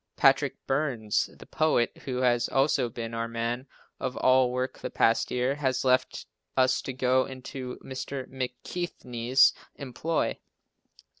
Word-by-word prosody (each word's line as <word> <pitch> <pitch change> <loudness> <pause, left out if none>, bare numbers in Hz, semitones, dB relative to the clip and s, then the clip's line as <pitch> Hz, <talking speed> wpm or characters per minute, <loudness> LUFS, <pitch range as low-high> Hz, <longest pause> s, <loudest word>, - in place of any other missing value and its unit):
Patrick - - +4
Burns, 135 -7 0
the - - -12
"poet," 155 -7 +1
who 130 -1 -2
has 120 -1 +2
also 135 -2 +2
been 115 0 -6
our 115 0 -2
man 115 +3 -3 0.3
of 130 -1 -3
all 130 -1 +4
work 125 +1 -2
the - - -4
past 115 0 +2
year, 125 +2 +1
has 135 -3 -1
left 130 0 +1 0.3
us 130 -1 +3
to - - -4
go 130 0 +2
into 130 -1 -7
Mr. 130 0 -5
McKechnie's 125 -1 +1 0.2
employ. 145 +4 -2
130 Hz, 135 wpm, -28 LUFS, 120-135 Hz, 0.3 s, Patrick